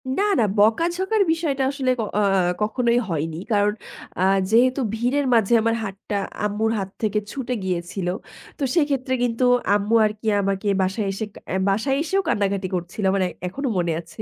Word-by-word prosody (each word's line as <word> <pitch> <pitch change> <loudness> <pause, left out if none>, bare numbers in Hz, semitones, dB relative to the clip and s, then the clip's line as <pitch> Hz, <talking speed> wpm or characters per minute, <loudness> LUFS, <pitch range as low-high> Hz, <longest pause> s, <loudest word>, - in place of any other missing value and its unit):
না, 400 - +1 0.2
না - - +4
বকা-ঝকার 345 - +2
বিষয়টা 300 -5 0
আসলে 265 -2 0
ক - - +2 0.2
আ - - +3 0.4
কখনোই 235 +2 +2
হয়নি। 160 0 -2
কারণ 205 0 +3 0.5
আ - - +2 0.3
যেহেতু 255 +4 +4
ভিড়ের 255 +5 0
মাঝে 230 0 +3
আমার 230 0 +1
হাতটা 200 0 -4 0.3
আম্মুর 215 +2 0
হাত 195 0 -4
থেকে 210 -1 +1
ছুটে 255 -2 -3
গিয়েছিল। 180 0 -3 0.5
তো 285 - -4
সেক্ষেত্রে 275 -5 +1
কিন্তু 240 +1 0 0.3
আম্মু 205 +2 +1
আর 210 - +1
কি 220 - -6
আমাকে 195 +1 -1
বাসায় 195 +3 -1
এসে, 195 +3 -4 0.3
আ - - 0
বাসায় 225 +8 +1
এসেও 385 +5 +1
কান্না-কাটি 200 -2 0
করছিল। 175 +4 -4
আমার 195 -1 +1 0.3
এখনো 270 +9 -4
মনে 170 -1 +1
আছে। 170 +6 -11
220 Hz, 165 wpm, -23 LUFS, 195-265 Hz, 0.5 s, না